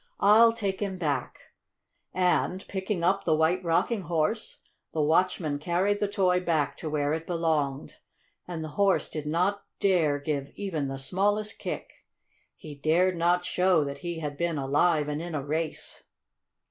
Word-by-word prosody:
I'll 225 +3 +7
take 200 -4 -3
him 195 -2 -3
back," 155 -5 -2 0.7
and, 180 +1 0
picking 190 -2 -3
up 195 +3 +2
the 160 - +2
White 165 +4 +2
Rocking 180 +6 +1
Horse, 170 +5 -2 0.3
the 155 - 0
watchman 160 -2 +1
carried 180 +6 0
the 205 - +1
toy 190 -3 +2
back 160 -5 0
to 155 - -5
where 145 -1 0
it 160 +1 -4
belonged. 155 -5 -1 0.5
And 170 -3 -5
the 155 - -5
Horse 195 +4 +1
did 150 -1 -5
not 185 +6 0 0.2
dare 170 -7 +3
give 140 -1 -3
even 165 -9 -3
the 135 0 -4
smallest 205 +9 -1
kick. - - -6 0.5
He 155 - -10
dared 165 +6 +2
not 175 +1 +2
show 180 -4 +3
that 140 0 -5
he 170 +2 -4
had 150 -3 -5
been 170 -2 -1
alive 150 +3 +2
and 150 +1 -3
in 170 -1 -5
a 140 -2 -3
race. 155 +2 -3
170 Hz, 160 wpm, -27 LUFS, 150-190 Hz, 0.7 s, I'll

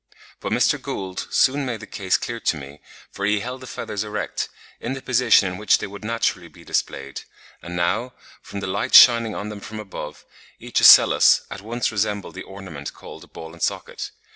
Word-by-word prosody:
But - - -5
Mr. - - +2
Gould 95 -1 -5
soon 140 +2 +2
made 120 -4 -3
the 110 - -9
case 95 -3 0
clear 120 -1 -5
to 80 - 0
me, 70 +1 -11 0.3
for 100 - -7
he 105 0 +1
held 125 +3 -6
the 130 - -10
feathers 105 -3 -4
erect, 105 0 -4 0.3
in 125 - -4
the 135 - -6
position 120 -5 +4
in 90 0 -5
which 105 - +4
they - - -5
would 100 +1 -10
naturally 105 -5 -1
be - - -17
displayed, 70 0 -3 0.4
and 85 +1 -7
now, 115 +9 -1 0.3
from 100 - -7
the - - -4
light 100 +7 0
shining 115 -3 +7
on 105 - -5
them 105 -1 -7
from 110 +2 -8
above, 95 -7 -8 0.3
each - - -1
ocellus - - +7
at 95 - -7
once 115 +4 -2
resembled 105 -2 -2
the 95 - -8
ornament 95 -8 -9
called - - -12
a - - -24
ball 80 0 -10
and 85 - -15
socket. - - -3
105 Hz, 200 wpm, -22 LUFS, 95-115 Hz, 0.4 s, shining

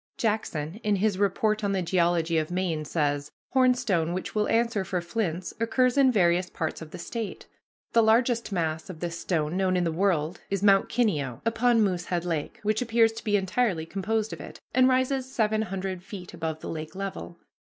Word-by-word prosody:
Jackson, 210 -6 -2
in 210 -1 +2
his 200 -1 +1
"Report 215 +2 +1
on 200 -1 +1
the 190 -2 0
Geology 170 -2 +2
of 155 - -3
Maine," 175 -4 -1
says: 145 -2 -1 0.2
"Hornstone, 245 -11 +2
which 185 - -4
will 210 -1 +1
answer 230 -3 +1
for 185 -1 -2
flints, 175 -1 -3
occurs 245 +2 +2
in 275 -2 +5
various 175 -4 +2
parts 160 0 -4
of 160 - -8
the - - -8
State. 220 +5 -5 0.5
The 230 - +6
largest 230 +1 +2
mass 160 -1 -2
of 170 -4 -8
this 170 0 -4
stone 160 -2 -1
known 185 -1 +2
in 180 - +1
the 165 - 0
world 170 -2 0
is 195 0 -1
Mount 195 -1 +5
Kineo, 150 - 0
upon 230 0 +3
Moosehead 180 -2 -1
Lake, 165 -4 -3
which 215 +2 +1
appears 230 -1 +3
to 225 +1 -9
be 205 -1 +2
entirely 190 -3 0
composed 210 +5 -2
of - - -7
it, - - -10
and 255 0 +5
rises 260 0 +1
seven 215 -3 +1
hundred 190 -3 -4
feet 185 -2 -9
above 160 -2 -4
the - - -6
lake 155 +1 -6
level. 195 -3 -5
195 Hz, 190 wpm, -27 LUFS, 170-225 Hz, 0.5 s, The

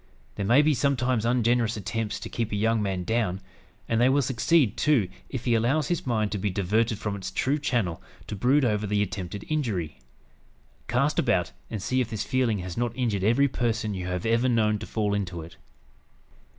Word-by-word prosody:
There 100 - -3
may 130 +6 +6
be 155 0 +3
sometimes 130 -3 +1
ungenerous 120 -1 +2
attempts 105 +2 -3
to 110 - -5
keep 115 -1 -3
a - - -1
young 110 +2 +1
man 95 -3 -2
down; 105 -3 0 0.5
and 115 0 +1
they 125 - +5
will 140 +1 +3
succeed, 130 - +2
too, 120 -6 +2 0.2
if 130 -3 -5
he 120 - +2
allows 130 +6 +1
his 175 -6 -2
mind 110 -4 0
to 105 - -2
be 105 +2 0
diverted 105 +4 0
from 105 0 -3
its 95 -2 -5
true 135 +9 0
channel 120 - -1 0.2
to - - -5
brood 130 +7 +3
over 105 -2 0
the 105 0 +1
attempted 95 0 -5
injury. 105 - -2 0.9
Cast 140 +5 +1
about, 100 -9 +1 0.2
and 105 -4 -5
see 130 0 +1
if 120 - -2
this 110 -2 -3
feeling 125 -4 +1
has 90 -2 -6
not 120 0 -1
injured 110 -7 0
every 120 +7 +4
person 115 -4 -1
you 90 -2 -4
have 90 +1 -3
ever 115 +3 +2
known 110 -3 +2
to 110 - -7
fall 105 -2 -1
into 90 -5 -3
it. 80 0 -13
115 Hz, 200 wpm, -26 LUFS, 100-125 Hz, 0.9 s, may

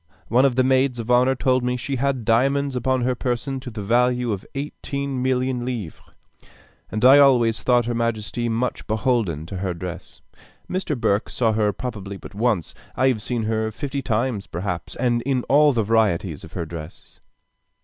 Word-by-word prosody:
One 125 +4 +4
of 130 -3 +2
the 130 - +3
maids 130 -1 +2
of 115 +1 -3
honor 125 +2 +4
told 130 0 +1
me 125 0 0
she 135 +2 -3
had 130 -2 -1
diamonds 135 +4 +2
upon 130 +1 0
her 125 +1 +1
person 125 +2 -2
to 130 -1 -8
the 110 -3 -6
value 125 +2 +2
of 100 -2 -3
eighteen 140 -1 -4
millions 130 -1 0
of 120 - -5
livres; 110 -10 -5 0.9
and 110 +3 -1
I 135 +3 +9
always 120 -5 +4
thought 120 -2 +3
her 120 - -1
majesty 115 0 -2
much 115 +2 -2
beholden 110 - 0
to 95 +3 -6
her 90 -2 -2
dress. 90 +1 -8 0.5
Mr. 180 -8 -2
Burke 100 -1 +1
saw 115 -3 +1
her 105 -1 +2
probably 100 -4 -6
but - - -12
once. 105 -5 0 0.2
I 130 - +3
have 115 -5 -1
seen 120 0 -2
her 110 0 0
fifty 135 +5 -4
times 115 -3 -1
perhaps, 85 -2 -4
and 120 -1 +1
in 130 0 0
all 145 +2 +5
the 115 -4 +1
varieties 100 -7 +1
of 80 - -12
her 85 -3 -3
dresses. 80 -1 -10
120 Hz, 185 wpm, -22 LUFS, 110-130 Hz, 0.9 s, I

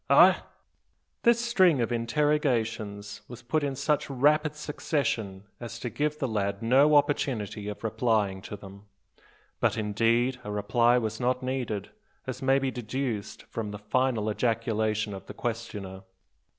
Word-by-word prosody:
Augh?" - - +7 0.8
This 235 0 +4
string 190 - +4
of 120 0 0
interrogations 115 -5 0
was 120 -1 -10
put 150 +5 0
in 140 -1 -1
such 150 +2 0
rapid 150 +3 +2
succession 135 -10 -2 0.2
as 120 -1 -7
to 120 0 -5
give 150 0 -1
the 135 - -1
lad 100 -2 -2
no 135 +6 +5
opportunity 125 -8 +1
of 105 +1 -6
replying 110 -4 +1
to 105 - -7
them. 100 0 -12 0.7
But, - - +1
indeed, 115 +4 +1
a 105 - -6
reply 115 +4 +3
was 110 -2 -2
not 125 +1 0
needed, 125 -6 -3 0.3
as 130 0 -5
may 135 0 +4
be 135 -1 0
deduced 120 -3 -4
from 110 -2 -5
the 105 - -6
final 110 +1 0
ejaculation 110 -2 0
of 95 - -9
the - - -8
questioner. 105 -5 -5
115 Hz, 145 wpm, -28 LUFS, 105-135 Hz, 0.8 s, Augh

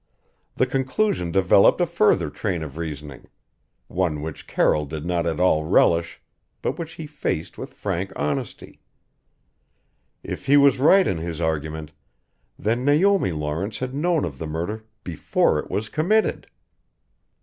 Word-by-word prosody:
The 130 - +2
conclusion 130 - 0
developed 95 - +5
a 175 - +3
further 105 - +2
train 90 -6 -3
of 75 -3 -8
reasoning 75 -4 -7 0.6
one 80 -5 -1
which 80 -1 -7
Carroll 75 -1 +1
did 75 +1 -6
not 85 -1 0
at 80 - -2
all 90 -4 +3
relish, 85 +1 +2 0.4
but - - -2
which 165 -1 -5
he 160 - -7
faced 145 - -3
with - - -8
frank 95 -1 -3
honesty. 75 0 -4 1.4
If - - -6
he 140 +2 +6
was 140 -2 +5
right 185 +7 +6
in 85 - -1
his 80 -1 -5
argument 80 -1 -3 0.7
then 115 +4 -1
Naomi 160 - +3
Lawrence 80 +7 -3
had 130 0 -4
known 165 +3 +1
of 70 -6 -7
the 80 - -4
murder 85 +8 -4 0.2
before 85 -4 +1
it - - -7
was 110 +1 -2
committed! 185 - +1
90 Hz, 145 wpm, -23 LUFS, -, 1.4 s, he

